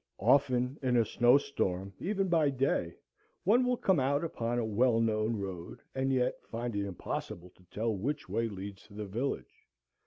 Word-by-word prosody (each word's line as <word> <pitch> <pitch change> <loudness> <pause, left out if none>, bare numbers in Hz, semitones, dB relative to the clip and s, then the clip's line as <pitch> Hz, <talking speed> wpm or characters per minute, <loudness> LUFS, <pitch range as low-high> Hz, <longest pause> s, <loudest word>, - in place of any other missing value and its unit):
Often 125 +3 +2
in 125 -2 +2
a 115 - +4
snow 120 +4 +5
storm, 95 -9 -2
even 195 0 0
by 165 -4 +3
day, 130 -10 0 0.5
one 235 +7 +4
will 250 0 +1
come 190 -8 +2
out 140 +3 +1
upon 120 -7 -2
a 120 - 0
well 115 +2 +3
known 110 0 +1
road 95 -3 -6
and 135 0 0
yet 125 -1 0
find 115 -1 -3
it 100 0 -1
impossible 90 -1 -5
to 90 - -24
tell 110 +5 -2
which 145 +10 -3
way 115 0 0
leads 100 -1 -7
to 100 - -15
the 105 0 -4
village. 105 - -4
120 Hz, 180 wpm, -31 LUFS, 100-140 Hz, 0.5 s, snow